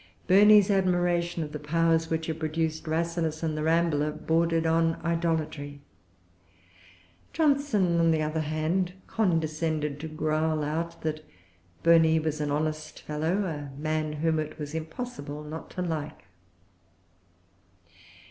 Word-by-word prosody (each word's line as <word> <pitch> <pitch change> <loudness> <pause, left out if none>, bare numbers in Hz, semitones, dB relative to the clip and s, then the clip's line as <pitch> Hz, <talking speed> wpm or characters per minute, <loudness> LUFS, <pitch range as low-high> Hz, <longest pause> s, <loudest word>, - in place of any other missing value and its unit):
Burney's 205 +1 +6
admiration 175 -3 +1
of 150 - -7
the 150 - -5
powers 165 +2 +1
which 160 0 -1
had 160 0 -4
produced 160 0 -2
Rasselas 165 0 -1
and 155 -1 -1
The 155 - -3
Rambler 160 -2 +2
bordered 165 +1 +1
on 165 0 +2
idolatry. 160 -4 -1 1.5
Johnson, 275 - +2
on 165 0 +4
the 160 -1 +2
other 155 +1 -1
hand, 155 +4 -1
condescended 155 -6 -1
to 160 - -5
growl 155 0 0
out 165 +3 -3
that 155 -1 -2 0.6
Burney 165 -1 +5
was 155 -1 -2
an 150 - -1
honest 155 +1 -2
fellow, 160 +7 -1
a 145 -5 -6
man 155 0 -1
whom 160 +1 0
it 155 0 -5
was 150 -1 -6
impossible 160 - -6
not 155 +2 -8
to 180 - -4
like. 155 -3 -4
160 Hz, 130 wpm, -27 LUFS, 155-170 Hz, 1.5 s, Burney's